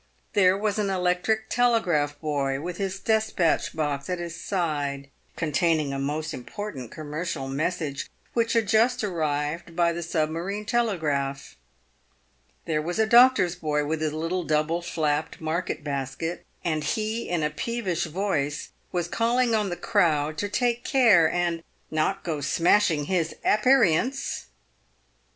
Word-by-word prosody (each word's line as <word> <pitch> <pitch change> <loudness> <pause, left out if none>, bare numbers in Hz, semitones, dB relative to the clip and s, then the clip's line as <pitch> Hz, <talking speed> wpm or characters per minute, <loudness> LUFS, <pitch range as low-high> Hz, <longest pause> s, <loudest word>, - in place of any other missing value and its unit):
There 190 -1 +4
was 210 0 -1
an 205 -2 0
electric 185 +4 0
telegraph 180 -13 +1
boy 140 -3 -1
with 175 +3 -5
his 195 -1 -3
despatch 220 -8 +1
box 145 -2 -2
at 180 - -1
his 170 -1 -5
side, 145 -7 -2 0.2
con 160 -2 -2
taining 155 -3 +2
a 135 - -3
most 155 +3 -2
important 135 - -6
commercial 155 -2 -4
message, 145 +1 -2 0.2
which 230 -1 +1
had 230 -3 +2
just 225 +4 +3
arrived 160 -2 -2
by 170 -1 +3
the 170 - -4
sub 155 -2 0
marine 195 +6 -4
telegraph. 155 - -1 1.1
There 155 -1 0
was 175 +3 -3
a 220 - +4
doctor's 240 -6 +6
boy, 150 -4 -1
with 155 +1 -2
his 155 -1 0
little 165 +4 -2
double 155 +2 0
flapped 155 -3 -1
market 160 -1 -2
basket, 140 +4 -4 0.2
and 155 -3 0
he 215 +8 -2
in 175 -3 0
a 150 - 0
peevish 185 -1 -2
voice 155 -4 -2 0.2
was 175 -2 -1
calling 235 +4 +1
on 210 -3 +1
the 175 - -2
crowd 155 -7 +1
to 205 - -1
take 240 +2 0
care 215 - +5
and 175 -1 -1 0.2
" - - -39
not 160 +5 0
go 155 -4 -3
smashing 165 +1 +3
his 165 -1 0
aperients." 245 - +2
170 Hz, 145 wpm, -26 LUFS, 150-205 Hz, 1.1 s, doctor's